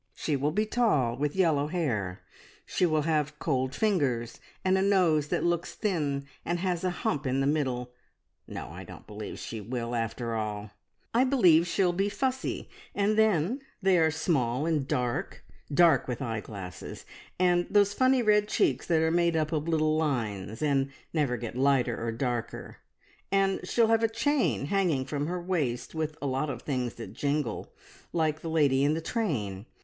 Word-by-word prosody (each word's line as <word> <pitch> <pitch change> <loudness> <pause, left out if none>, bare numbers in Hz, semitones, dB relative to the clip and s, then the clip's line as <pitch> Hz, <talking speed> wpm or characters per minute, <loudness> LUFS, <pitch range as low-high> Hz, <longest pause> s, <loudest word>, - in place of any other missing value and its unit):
"She 150 - -1
will 140 +2 +1
be 210 +8 0
tall, 205 - +2
with 145 +4 -2
yellow 160 -6 +2
hair. 115 - -2 0.4
She 180 - +1
will 155 -2 +1
have 150 -2 0
cold 130 -4 -1
fingers 135 - 0 0.3
and 185 0 +4
a 190 - +2
nose 180 -7 +3
that - - -1
looks 175 0 -1
thin 145 -9 -1 0.2
and 175 - -1
has 180 -1 -1
a 185 - +2
hump 150 -5 -2
in 130 +1 +1
the 135 - +1
middle. 130 -4 -1 0.6
No, - - -6
I - - -8
don't - - -12
believe 105 0 -7
she 110 -2 -6
will, 120 +2 -4
after 115 0 -2
all. 105 -1 -3 0.4
I 240 +3 +4
believe 180 - +5
she'll 180 0 +2
be 195 +3 0
fussy, 265 +4 -2 0.3
and 205 +1 +2
then 220 - +2 0.2
they 190 -3 +3
are 160 -1 +4
small 145 -5 0
and 155 -5 0
dark 125 -3 -2 0.3
dark, 160 -2 +5
with 125 -2 -3
eyeglasses, 105 -7 -6 0.3
and 175 -1 +3
those 205 -1 +4
funny 255 +1 +3
red 210 -1 +4
cheeks 135 -9 +1
that 160 -2 +3
are 160 - +2
made 170 0 +2
up 155 -1 0
of 155 -1 -1
little 155 -1 +2
lines, 115 -6 -2
and 140 -2 +2 0.2
never 145 -6 +1
get 115 -1 -6
lighter 130 -3 +2
or 115 - -1
darker. 120 0 -4 0.5
And 195 -1 +2
she'll 230 -2 +3
have 225 0 +4
a 225 - +2
chain 225 - +1
hanging 165 -6 +1
from 145 +1 -2
her 180 +1 -2
waist 160 -9 -2
with 155 -1 -3
a - - -1
lot 135 +2 -1
of - - -5
things 125 -4 -2
that 115 - -8
jingle, 145 -5 -2 0.4
like 155 -2 0
the 165 - -4
lady 140 -4 +3
in 145 +2 +3
the - - -1
train. 120 - -2
150 Hz, 175 wpm, -28 LUFS, 125-180 Hz, 0.6 s, believe